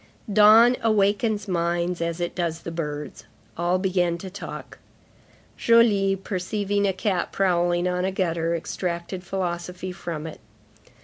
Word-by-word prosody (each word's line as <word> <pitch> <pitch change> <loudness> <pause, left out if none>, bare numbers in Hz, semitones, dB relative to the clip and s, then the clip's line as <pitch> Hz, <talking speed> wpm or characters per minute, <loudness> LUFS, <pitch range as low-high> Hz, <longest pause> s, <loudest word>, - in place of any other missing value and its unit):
Dawn 220 +4 +7
awakens 210 0 +1
minds 175 -1 -1
as 170 0 -2
it 175 0 -2
does 165 -2 -2
the 170 - -6
birds; 150 -3 -5 0.3
all 175 +2 +1
began 180 -2 0
to 185 +2 -8
talk. 200 - -8 0.8
Joly, 210 -4 +4
perceiving 200 +1 -1
a - - +2
cat 190 -1 -1
prowling 175 -2 +1
on 180 0 -1
a 190 - 0
gutter, 170 -3 -1
extracted 170 +2 -4
philosophy 180 0 -4
from 165 -4 -6
it. 160 - -8
180 Hz, 130 wpm, -24 LUFS, 170-195 Hz, 0.8 s, Dawn